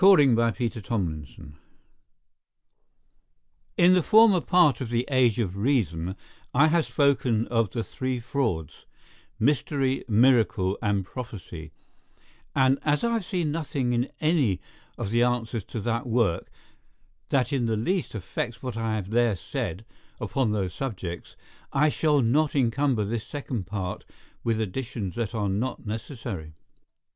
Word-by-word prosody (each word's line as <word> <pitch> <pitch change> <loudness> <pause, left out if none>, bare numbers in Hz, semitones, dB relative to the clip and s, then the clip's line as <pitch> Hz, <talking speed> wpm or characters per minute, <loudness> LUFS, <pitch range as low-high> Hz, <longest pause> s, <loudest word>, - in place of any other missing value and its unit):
CHAPTER 195 -3 +8
III 115 -3 +2
CONCLUSION 80 - -4 2.2
IN 175 +1 +6
the 180 - +4
former 215 -1 +6
part 165 -10 +4
of 125 - -3
'The 120 +1 0
Age 125 -4 +3
of 100 -5 -2
Reason' 95 - 0 0.4
I 150 +4 +6
have 165 0 +2
spoken 130 -6 +2
of 115 -3 +1
the 115 +4 -3
three 130 +1 -3
frauds, 115 - -3 0.5
mystery, 135 +1 +1
miracle, 110 -4 +3
and 100 -3 0
Prophecy; 90 -9 -8 0.8
and 135 0 +4
as 150 +4 +1
I 235 0 +1
have 225 -3 0
seen 175 -6 -1
nothing 145 -5 -1
in 120 +2 0
any 150 - +2 0.4
of 100 - -3
the 120 +1 +3
answers 120 -3 0
to 115 - -5
that 115 +2 -1
work 115 -7 +1 0.8
that 135 0 +1
in 125 -4 +1
the 110 -1 0
least 175 - -1
affects 110 +5 -4
what 125 -3 -4
I 115 -1 -1
have 100 -2 -4
there 120 -2 +3
said 85 +3 -4 0.3
upon 110 +2 0
those 95 -4 -1
subjects, 95 -10 -5 0.4
I 150 +3 +4
shall 150 -1 +2
not 145 +7 +2
encumber 130 -3 +2
this 110 +1 -3
Second 130 -9 -4
Part 95 -3 -4 0.4
with 115 -1 0
additions 110 -2 -3
that 115 -1 -3
are 105 -2 0
not 110 +7 -2
necessary. 105 - -6
120 Hz, 140 wpm, -26 LUFS, 105-135 Hz, 2.2 s, CHAPTER